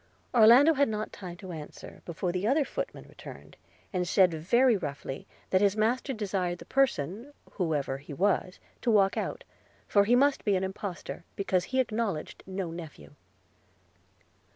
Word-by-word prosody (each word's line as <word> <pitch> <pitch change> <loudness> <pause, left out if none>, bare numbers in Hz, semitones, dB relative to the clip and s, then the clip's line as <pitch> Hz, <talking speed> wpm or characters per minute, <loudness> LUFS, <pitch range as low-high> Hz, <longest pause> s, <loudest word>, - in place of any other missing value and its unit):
Orlando 245 +7 +7
had 280 -3 +2
not 215 0 -4
time 180 -3 -8
to 190 -1 -9
answer, 155 -3 -9
before 175 +1 -3
the 180 +3 -1
other 280 +4 +3
footman - - -5
returned, - - -12 0.4
and 180 -1 -1
said 185 -1 +4
very 235 +10 +3
roughly, 140 -6 -5 0.2
that 185 - +4
his 205 0 +3
master 240 +6 +1
desired 190 -6 -2
the - - -12
person, 240 - 0 0.2
whoever 150 -7 -1
he 145 +2 -12
was, 185 +3 0 0.2
to 245 - 0
walk 200 -3 +4
out - - -3 0.2
– - - -34
for 200 -1 +4
he 240 +4 +4
must 280 +2 +3
be 205 -2 +2
an 185 - 0
impostor, 190 -2 -5
because 185 -2 0
he 260 - -1
acknowledged 220 -9 -2
no 190 -3 -4
nephew. 150 - -10
195 Hz, 160 wpm, -29 LUFS, 175-235 Hz, 0.4 s, Orlando